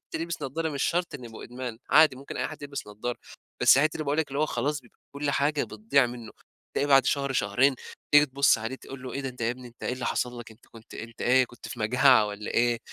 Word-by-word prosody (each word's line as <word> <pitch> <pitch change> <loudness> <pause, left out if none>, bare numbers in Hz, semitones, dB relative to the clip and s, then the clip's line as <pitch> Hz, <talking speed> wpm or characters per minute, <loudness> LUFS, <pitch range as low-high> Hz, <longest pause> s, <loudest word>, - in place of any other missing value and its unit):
يلبِس 165 -2 -3
نضارة 160 +4 -2
مش 140 -3 -3
شرط 175 0 0
إنه 125 -3 -7
يبقى 110 -1 -10
إدمان 125 -2 -7
عادي، 155 -4 +6
ممكن 140 - -8
أي 125 - -1
حد - - -10
يلبِس 140 -1 -6
نضارة. 105 +4 -5 0.4
بس 135 - +7
حتة 155 +2 +2
اللي 155 - -4
باقول 145 +2 -1
لك 160 - +1
اللي 140 +1 -4
هو 155 - +2
خلاص 140 +4 -2
بيبقى 120 - -24 0.2
كل 145 0 -1
حاجة 145 +1 +1
بتضِيِع 115 +5 +1
منه، 120 -2 -9 0.4
بتلاقي 145 - 0
بعد 135 -1 +6
شهر 140 -1 0
شهرين 130 +4 +2 0.4
تيجي 145 0 +7
تبُص 135 -3 +3
عليه 115 +4 -4
تقول 135 -1 -11
له: 130 - -6
"إيه 140 - -3
ده؟ 135 - -3
أنت 125 -1 -11
يا 115 - +1
ابني 125 0 -8
أنت 120 - -21
إيه - - -1
اللي 130 0 -4
حصل 125 -1 -2
لك، 115 - -11
أنت 110 +2 -18
كنت 115 -1 -15
أنت 115 0 -8
إيه 130 +1 +4
كنت 120 - -12
في 120 - -8
مجاعة 125 0 +5
والّا 105 0 -6
إيه؟! 120 0 +2
130 Hz, 250 wpm, -27 LUFS, 120-140 Hz, 0.4 s, بس